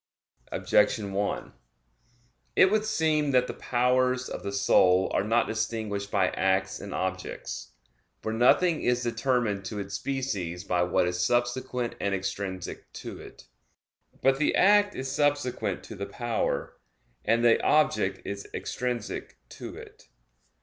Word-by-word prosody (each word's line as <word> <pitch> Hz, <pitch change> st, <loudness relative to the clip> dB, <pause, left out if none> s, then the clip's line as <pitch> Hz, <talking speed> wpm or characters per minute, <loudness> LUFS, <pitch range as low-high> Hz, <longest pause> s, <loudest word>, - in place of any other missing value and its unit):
Objection 100 Hz, -2 st, +2 dB
1: 100 Hz, +1 st, -2 dB, 1.0 s
It 190 Hz, -, +6 dB
would 215 Hz, 0 st, +2 dB
seem 155 Hz, -8 st, +1 dB
that 125 Hz, -2 st, +4 dB
the -, -, -5 dB
powers 125 Hz, +1 st, +1 dB
of -, -, -5 dB
the 100 Hz, -, -4 dB
soul 95 Hz, -1 st, +4 dB
are -, -, +2 dB
not 115 Hz, +3 st, +2 dB
distinguished 110 Hz, -2 st, -3 dB
by 95 Hz, -3 st, +2 dB
acts 95 Hz, 0 st, 0 dB
and 100 Hz, -, -8 dB
objects. 95 Hz, 0 st, -4 dB, 0.5 s
For 110 Hz, -, -2 dB
nothing 155 Hz, +8 st, +4 dB
is 125 Hz, 0 st, +1 dB
determined 120 Hz, -4 st, 0 dB
to 105 Hz, -, -5 dB
its 100 Hz, 0 st, -5 dB
species 100 Hz, -8 st, -3 dB
by 90 Hz, -3 st, 0 dB
what 90 Hz, 0 st, +2 dB
is 90 Hz, 0 st, -1 dB
subsequent 120 Hz, +1 st, 0 dB
and 100 Hz, -1 st, 0 dB
extrinsic 95 Hz, -1 st, -5 dB
to -, -, -8 dB
it. -, -, -13 dB, 0.8 s
But 135 Hz, 0 st, +4 dB
the 150 Hz, -, +2 dB
act 205 Hz, +1 st, +5 dB
is 130 Hz, 0 st, -4 dB
subsequent 145 Hz, -4 st, 0 dB
to -, -, -9 dB
the 100 Hz, 0 st, -5 dB
power; 120 Hz, +3 st, -2 dB, 0.5 s
and 115 Hz, +1 st, +2 dB
the 115 Hz, -, +5 dB
object 110 Hz, -10 st, +2 dB
is 100 Hz, 0 st, -5 dB
extrinsic 125 Hz, -3 st, -4 dB
to -, -, -8 dB
it. -, -, -13 dB
115 Hz, 140 wpm, -27 LUFS, 100-130 Hz, 1.0 s, It